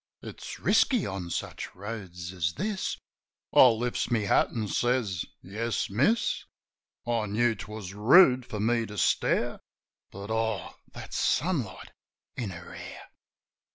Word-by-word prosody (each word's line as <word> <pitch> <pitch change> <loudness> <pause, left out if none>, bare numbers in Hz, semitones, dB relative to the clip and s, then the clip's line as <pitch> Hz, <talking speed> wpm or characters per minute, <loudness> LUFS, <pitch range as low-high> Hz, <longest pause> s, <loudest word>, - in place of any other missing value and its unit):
"It's - - -8
risky 245 -7 +3
on 95 -3 -4
such - - -5
roads 95 -4 -7
as 85 -2 -1
this." 200 +3 -2 0.6
I 130 - +9
lifts 120 +1 0
my 115 -2 +2
hat 100 - +3
an' 110 -3 -3
says, 120 -7 0 0.2
"Yes, 110 +3 -2
miss." 205 - +2 0.6
I 115 -2 0
knew 115 +3 +2
'twas 105 -2 -8
rude 125 - +6
for 105 - -6
me 115 +1 +1
to 105 - -9
stare. - - +1 0.5
But, 100 +2 -8
oh, 110 0 -1 0.2
that - - -9
sunlight - - 0 0.4
in 120 -5 -3
her 90 -1 -9
hair! - - -10
110 Hz, 130 wpm, -28 LUFS, 100-120 Hz, 0.6 s, I